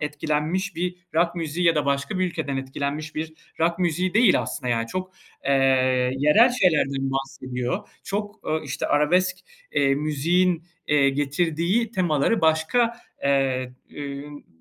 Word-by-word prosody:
etkilenmiş 155 +5 -2
bir 180 +1 -2 0.2
rock 170 +1 +2
müziği 170 +1 -2
ya 165 - +5
da 150 -2 +1
başka 140 +6 -1
bir 185 - +2
ülkeden 155 -6 -3
etkilenmiş 140 +3 -4
bir 160 +1 -4 0.3
rock 170 +2 +2
müziği 180 +2 0
değil 225 -3 +5
aslında. 125 - -4
Yani, 115 -1 0
çok, 185 +7 -5 0.3
eee, - - 0 0.7
yerel 150 - +5
şeylerden 145 - +1
bahsediyor, 130 +5 -3 0.2
çok, 205 +2 -4
ooo, 155 0 -1
işte, 140 0 -3
arabesk, 170 +6 +2 0.4
eee, 135 -1 +3
müziğin, 165 +4 +1 0.2
eee, 145 -2 +4
getirdiği 165 - 0
temaları 180 0 +1
başka, 160 +10 +2 0.3
eee, 135 -2 +1 0.2
ün 145 0 -8
155 Hz, 135 wpm, -24 LUFS, 140-180 Hz, 0.7 s, ya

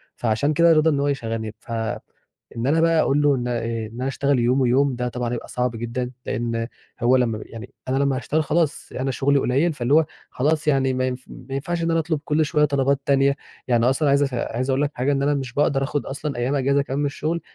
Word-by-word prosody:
فعشان 120 +6 0
كده 170 +2 +5
رضى 155 0 +4
إن 145 -3 +1
هو 140 - +1
يشغلني، 115 -5 -3
ف - - -12 0.8
إن 115 +2 -2
أنا 160 +3 +3
بقى 165 -1 +3
أقول 145 0 +2
له 145 -1 +4
إن 125 -1 -3
إيه 115 -2 -2
إن 115 - -14
أنا 130 +2 -3
اشتغل 140 0 +1
يوم 125 +3 +2
ويوم 130 +2 +3
ده 125 0 -2
طبعًا 120 -1 -3
هيبقى 120 - -5
صعب 125 0 -1
جدًا، 120 +2 -3
لأن 115 -1 -2 0.3
هو 125 +2 +4
لمّا 115 -4 0
يعني 115 +1 -10
أنا 130 - 0
لمّا 140 -1 +1
هاشتغل 155 +4 0
خلاص 160 -1 0
أنا 135 +1 0
شغلي 140 +2 +2
قليل 140 +7 +1
فاللي 130 0 -1
هو 160 0 +5 0.2
خلاص 155 +3 0
يعني 135 -3 +2
ما 130 0 0
ينف 130 0 -5
ما 135 +1 -8
ينفعش 170 +5 -2
إن 165 - +1
أنا 165 - +2
أطلب 160 -1 -1
كل 155 +1 +2
شوية 150 +1 +2
طلبات 140 -1 +1
تانية، 140 0 +3 0.3
يعني 120 -2 +3
أصلًا 140 +2 +1
عايز 140 +1 +4
اف 135 -2 -2
عايز 125 +1 -2
أقول 135 +1 +2
لك 145 - 0
حاجة 130 +3 0
إن 135 -1 0
أنا 145 +1 +2
مش 135 -4 -3
باقدر 140 0 +2
آخد 145 +1 -2
أصلًا 140 +1 -4
أيام 125 +4 0
إجازة 140 +1 +2
كمان 140 0 -3
من 145 - +1
الشغل، 155 +4 -2
135 Hz, 235 wpm, -23 LUFS, 125-145 Hz, 0.8 s, كده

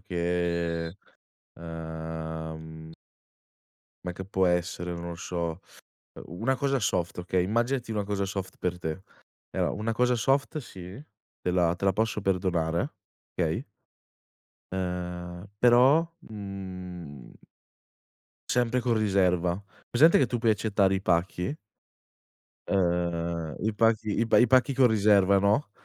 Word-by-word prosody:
che, 85 -2 -1 0.6
ehm 80 -1 -6 1.1
me 90 - -3
che 95 +2 -7
può 95 -1 +2
essere, 90 0 -1
non 85 0 -5
lo 85 - -5
so, 85 -1 -3 0.7
una 115 +11 -1
cosa 140 0 +1
soft, 90 -4 -1
okay. 90 0 0
Immaginati 120 +4 0
una 105 -1 -1
cosa 100 -1 -1
soft 95 -1 -5
per 90 -1 -2
te. 80 +2 -4 0.5
Allora, - - 0
una 110 +2 -2
cosa 125 +1 +2
soft 135 +4 +1
sì, 90 -9 -9 0.5
te 90 - 0
la 90 -1 +2
te 100 - -5
la 95 - +4
posso 110 +1 0
perdonare, 90 -4 0 0.4
okay? - - -1 1.1
Ehm, 90 0 -4
però, 130 +7 +6
mhmm 90 - -8 1.2
sempre 125 0 +2
con 120 -1 +1
riserva. 90 -3 +2 0.3
Presente 155 +8 +6
che 135 - +4
tu 120 - -1
puoi 115 -1 +3
accettare 100 -2 +2
i 95 - -2
pacchi? 90 - 0 1.1
Uhm, 85 -3 0
i 110 - +2
pacchi 110 -1 +2
i - - +3
pa - - +5
i 120 - +7
pacchi 130 +3 +4
con 130 -2 +6
riserva, 100 -3 +4
no, 105 +5 +2
95 Hz, 125 wpm, -28 LUFS, 85-110 Hz, 1.2 s, i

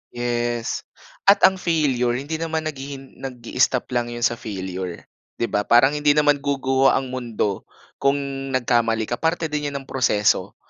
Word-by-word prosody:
Yes. 120 -1 -2 0.4
At 200 - +6
ang 190 0 +6
failure, 135 -9 +1
hindi 145 +5 -4
naman 160 -1 -2
naghihin 135 -3 -7
nag-i-stop 125 0 -1
lang 120 -1 0
'yon 120 0 -5
sa 120 -1 +1
failure, 95 -3 -5 0.3
'di 115 - -1
ba? 105 0 0
Parang 125 +4 +6
hindi 145 0 +2
naman 145 -1 +4
guguho 135 -1 +1
ang 130 -1 +1
mundo 115 -6 -3 0.3
kung 140 +1 +3 0.4
nagkamali 115 -2 +2
ka. 120 +2 -4
Parte 165 -1 0
din 150 -1 -1
'yan 140 - -5
ng - - -23
proseso, 105 -6 +1
130 Hz, 155 wpm, -22 LUFS, 120-145 Hz, 0.4 s, At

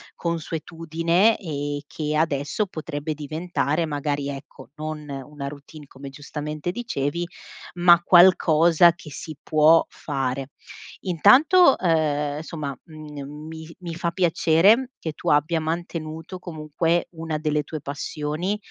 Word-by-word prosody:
consuetudine 165 +4 0
e 145 -5 -4
che 150 -1 -3
adesso 150 +6 0
potrebbe 155 -2 -5
diventare 155 +1 -2
magari, 145 -1 -2
ecco, 135 -1 -9
non 155 -1 -6
una 140 +1 -6
routine, 145 +1 -12
come, 135 +1 -10
giustamente, 150 +3 -5
dicevi, 175 - -3 0.5
ma 175 -1 +6
qualcosa 170 -2 +6
che 170 -2 -12
si 155 +2 -7
può 155 +2 +5
fare. 135 -1 -3 0.5
Intanto, 270 - +5
ehm, 150 -4 0
somma, 150 -4 -5
mhmm, 150 -2 -9
mi 160 0 -9
mi 170 -2 -6
fa 170 0 -2
piacere 185 +8 +3
che 160 - -4
tu - - -10
abbia 150 +3 +2
mantenuto 160 +1 -5
comunque 165 0 -1
una 160 -2 -4
delle 150 -1 0
tue 150 0 -7
passioni 150 +6 -3
155 Hz, 120 wpm, -24 LUFS, 145-170 Hz, 0.5 s, ma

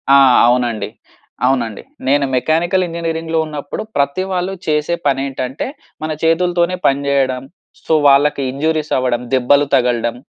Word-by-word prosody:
ఆ! - - +8 0.3
అవునండి. 120 -3 0 0.6
అవునండి. 120 -5 0 0.3
నేను 140 +1 +3
మెకానికల్ 165 +7 +1
ఇంజినీరింగ్‌లో 165 -1 -2
ఉన్నప్పుడు 150 +6 -6
ప్రతి 140 +6 0
వాళ్ళు 185 +1 -1
చేసే 150 +2 0
పని 135 -1 +1
ఏంటంటే 130 0 -4 0.4
మన 155 0 -3
చేతులతోనే 175 +2 +2
పని 140 0 +2
చేయడం. 130 -2 0 0.4
సొ 160 - +1
వాళ్ళకి 140 +1 +4
ఇంజురీస్ 155 +2 -1
అవ్వడం, 125 -2 0
దెబ్బలు 135 +3 +3
తగలడం, 120 -2 +1
140 Hz, 130 wpm, -17 LUFS, 130-160 Hz, 0.6 s, ఆ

